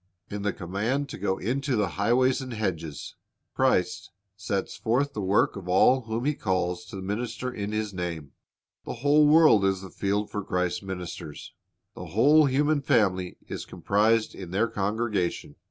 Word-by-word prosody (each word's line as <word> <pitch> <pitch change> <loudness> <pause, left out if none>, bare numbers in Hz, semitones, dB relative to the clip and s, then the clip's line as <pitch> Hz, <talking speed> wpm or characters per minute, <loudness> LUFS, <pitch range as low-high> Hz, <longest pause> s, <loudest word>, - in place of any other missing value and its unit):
In 105 0 -4
the 105 0 0
command 110 +12 -2
to - - -7
go 95 -1 0
into 135 +5 -1
the 105 -4 +1
highways 125 - +2
and 130 -2 -6
hedges, 85 -8 -4 0.4
Christ - - +1 0.3
sets 95 0 -3
forth 135 +5 0
the 105 - -3
work 95 +1 +2
of 95 -3 -8
all 125 +7 +4
whom 115 +2 -3
He 150 - +2
calls 90 -6 -1
to - - -10
minister 120 +5 -3
in 105 -1 -4
His 110 -1 -2
name. 85 -6 -5 0.5
The - - -5
whole 150 +1 +6
world 150 -9 +6
is 95 -1 +1
the 95 - -10
field 100 +1 -1
for 105 - -3
Christ's 90 -1 -1
ministers. 90 -5 -7 0.4
The 90 - -8
whole 145 - +5
human 145 +2 +2
family 95 -8 +1
is - - -5
comprised 110 +2 +1
in 90 -3 -8
their 100 +6 +1
congregation. 105 -3 -2
105 Hz, 165 wpm, -26 LUFS, 95-125 Hz, 0.5 s, whole